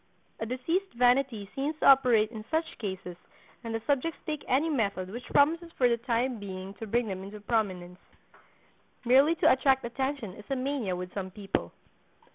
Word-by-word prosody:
A 220 - -3
diseased 325 - -1
vanity 245 -3 +2
seems 290 +3 -2
to - - -2
operate 245 -5 +6
in 220 -2 -7
such 320 +1 +1
cases 190 -4 -5 0.5
and 230 - -5
the - - -1
subjects 290 +3 0
take 305 -2 -3
any 275 +5 +2
method 200 - -1
which 240 +3 -7
promises 330 +4 +3
for 250 - +4
the 235 - +3
time 240 0 -1
being 190 -1 -7
to 225 - -6
bring 235 +2 +1
them 190 -2 -4
into 205 +2 -9
prominence. 190 -5 -2 1.1
Merely 270 +7 +5
to - - +4
attract 265 -1 +3
attention 265 -3 -3
is 210 +1 -13
a 275 - 0
mania 255 -7 -2
with 180 0 -6
some 190 -2 -4
people. 195 +1 -3
240 Hz, 175 wpm, -29 LUFS, 205-275 Hz, 1.1 s, operate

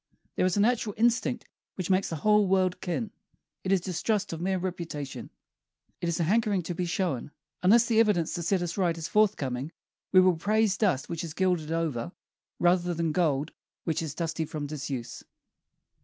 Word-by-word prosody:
There 185 - +2
is 185 - 0
a - - +4
natural 220 -2 +1
instinct 240 +1 +1 0.3
which 185 0 -2
makes 190 +1 +2
the 165 - -3
whole 210 +5 +3
world 185 -1 +1
kin. 195 +4 -2 0.5
It 190 - -1
is 195 - +4
distrust 195 +2 -1
of 165 - -5
a - - -5
mere 190 0 +1
reputation. 170 -6 -5 0.7
It 170 - 0
is 170 - -1
a - - +2
hankering 205 +1 +2
to 175 - -4
be 175 +1 -2
shown. 170 -8 -1 0.3
Unless 225 +6 +5
the 225 -2 +2
evidence 205 -8 +2
to 175 - -3
set 175 +2 +1
us 175 +3 -4
right 170 -3 +1
is 165 -1 -4
forthcoming, 150 -10 +1 0.4
we 185 - +7
will 185 -2 +4
praise 210 +3 +2
dust 180 -12 +1
which 170 -1 -4
is 165 -1 -6
gilded 180 -4 0
over 165 -4 -1 0.5
rather 175 0 +2
than 165 -1 0
gold 150 -3 +1 0.3
which 160 -2 -1
is 155 -2 -5
dusty 165 -1 -2
from 150 -1 -5
disuse. 140 -5 -5
175 Hz, 185 wpm, -28 LUFS, 160-200 Hz, 0.7 s, we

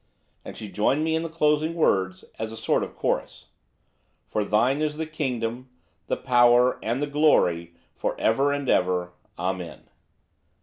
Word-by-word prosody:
And - - -9
she 110 - -7
joined 110 +9 +1
me 160 0 0
in 160 - +1
the 165 - -4
closing 155 0 +1
words, 95 - +1
as 110 0 -3
a 110 - -8
sort - - +1
of - - -6
chorus. - - -3 0.8
'For 105 - -1
Thine 120 +8 +2
is 150 -1 -1
the 160 - -2
Kingdom, 130 -5 -3 0.4
the - - -1
Power, 120 0 +4
and 120 +6 -1
the - - +2
Glory, 90 - +2 0.2
for - - -3
ever 135 +6 +2
and 145 -1 -2
ever. 90 -3 +1 0.2
Amen. 90 -1 -4
125 Hz, 160 wpm, -25 LUFS, 105-150 Hz, 0.8 s, Power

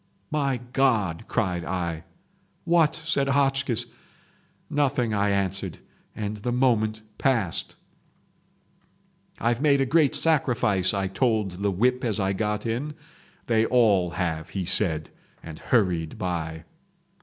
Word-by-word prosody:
'My 140 -4 0
God!' 110 -10 +1
cried 90 -6 -1
I. 85 -3 -3 0.6
'What?' 165 -3 +3
said 145 -4 +1
Hotchkiss. 135 -3 +1 0.8
'Nothing!' 135 -6 0
I 100 0 +1
answered, 100 -2 -1 0.4
and 105 0 -4
the 120 +4 -3
moment 110 -4 +1 0.2
passed. 115 -10 0 1.6
"'I've 120 +2 0
made 145 -2 +4
a 135 - +2
great 145 +1 +3
sacrifice,' 115 - +2
I 95 -1 0
told 105 +1 0
the 100 - +1
whip 125 +7 +1
as 110 -3 0
I 95 0 +1
got 105 +2 -2
in. 130 +7 -3 0.5
They 115 -1 +2
all 105 -8 +3
have,' 85 -2 -3
he 95 -2 -3
said, 85 -4 0 0.3
and 80 -1 -9
hurried 90 -9 0
by. 80 -3 -3
110 Hz, 120 wpm, -25 LUFS, 95-130 Hz, 1.6 s, made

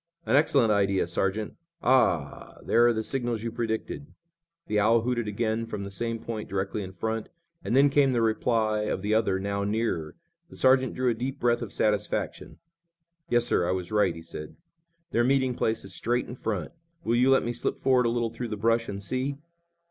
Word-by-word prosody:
"An - - +2
excellent 140 -6 +4
idea, 100 -2 +2
Sergeant. 95 +4 -2 0.3
Ah! 105 - +1
there 120 +1 +4
are - - +5
the 110 -1 -1
signals 120 -3 -2
you 115 - -3
predicted!" 115 +4 -3 0.6
The 105 0 0
owl 115 +3 +4
hooted 120 -1 -1
again 110 +2 -1
from 105 -3 -5
the 100 - -7
same 115 +3 -2
point 110 -1 -6
directly 95 +2 -2
in 95 -1 -6
front, 110 +4 -3 0.3
and - - -1
then 140 +1 +5
came 140 -1 +4
the 120 -2 +1
reply 110 -1 +1
of 95 - -2
the 105 +1 0
other, 110 -4 +2
now 100 +1 -2
nearer. 100 -7 -1 0.3
The - - -13
sergeant 130 -1 +3
drew 125 -1 +1
a - - +1
deep 130 +5 -4
breath 120 0 +2
of 115 -4 -5
satisfaction. 105 -1 -1 0.7
"Yes, 120 0 +3
sir, 90 -7 +1
I - - +2
was 90 0 -4
right," 105 -5 +2
he 80 - -9
said. 75 -2 -8 0.6
"Their 120 - +2
meeting 130 0 +2
place 110 -2 -1
is 95 - -7
straight 120 +7 -1
in - - -7
front. 105 -8 -3 0.3
Will 115 - +1
you 125 +2 +4
let 135 -3 +4
me 120 - -1
slip 120 - -2
forward 130 -2 +3
a - - +2
little 115 -1 -1
through 120 +1 -5
the 105 - -4
brush 115 +2 +1
and 100 0 -5
see?" 130 +6 -2
115 Hz, 200 wpm, -27 LUFS, 100-120 Hz, 0.7 s, are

